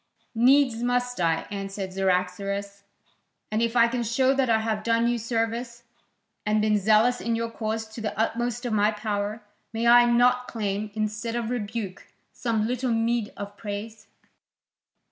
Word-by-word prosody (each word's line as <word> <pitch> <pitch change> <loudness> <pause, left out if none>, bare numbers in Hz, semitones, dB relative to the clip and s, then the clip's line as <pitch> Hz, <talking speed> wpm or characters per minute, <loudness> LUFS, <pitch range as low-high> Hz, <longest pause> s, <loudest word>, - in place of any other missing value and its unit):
"Needs 250 0 +4
must 245 -2 0
I," 165 -1 +1
answered 195 -1 -5
Cyaxares. 195 +2 -1 0.7
"And 215 +1 0
if 230 0 0
I 235 -1 +6
can 240 +1 -2
show 255 +4 +2
that 265 -2 +1
I 225 - +4
have 220 -1 -1
done 230 +1 +2
you 240 0 0
service, 235 +1 -2 0.6
and 210 +1 +1
been 210 0 +2
zealous 220 +5 +3
in 230 0 0
your 230 0 -2
cause 220 0 -3
to 220 +1 -8
the 215 -2 -4
utmost 240 +2 -1
of 240 - -1
my 210 0 +3
power, 210 0 -3 0.3
may 225 +1 -2
I 240 +1 +7
not 245 +1 +3
claim, 210 -2 -3
instead 215 +2 -2
of 235 -1 -2
rebuke, 210 -4 -4 0.3
some 225 -3 -1
little 250 +2 -1
meed 230 -1 0
of 200 0 -7
praise?" 215 +1 -7
225 Hz, 160 wpm, -26 LUFS, 210-240 Hz, 0.7 s, I